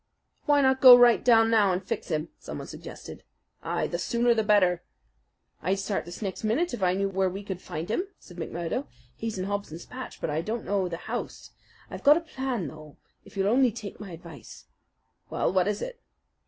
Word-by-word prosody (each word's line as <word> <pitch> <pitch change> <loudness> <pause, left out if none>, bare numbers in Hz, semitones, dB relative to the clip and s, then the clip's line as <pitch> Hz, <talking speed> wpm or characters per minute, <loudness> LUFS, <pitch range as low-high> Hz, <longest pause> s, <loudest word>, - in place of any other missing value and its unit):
"Why 290 -1 +5
not 265 0 +3
go 250 -2 +11
right 245 -1 +5
down 225 -2 +5
now 210 -4 +4
and 185 +2 -1
fix - - -3
him?" 155 -1 -2
someone - - -7
suggested. - - -10 0.4
"Ay, - - -1
the - - -3
sooner 240 0 +2
the 225 - +1
better." 185 -5 +3 0.8
"I'd 190 +4 0
start 195 0 -2
this 175 +5 -8
next 195 +2 -4
minute 265 +12 +1
if 240 - -4
I 180 -1 +2
knew 195 +1 0
where 190 -1 0
we 195 +3 -6
could 190 -2 -6
find 155 +3 -5
him," 360 - -1
said 175 - -15
McMurdo. 170 +9 -3 0.3
"He's 225 -2 -4
in 185 - -2
Hobson's 200 -5 -4
Patch; 255 0 -8
but - - -2
I 155 +2 0
don't 220 +6 -4
know 195 -3 0
the 165 - -4
house. - - -6 0.4
I've - - -7
got 295 +2 +7
a - - -2
plan, 260 - -3
though, 155 0 -11 0.3
if - - -14
you'll 195 0 +1
only 250 +3 +4
take 210 -2 -8
my 205 - -8
advice." 165 -3 -11 0.6
"Well, - - 0
what 185 0 +3
is 210 -1 -1
it?" - - -7
200 Hz, 205 wpm, -27 LUFS, 180-240 Hz, 0.8 s, go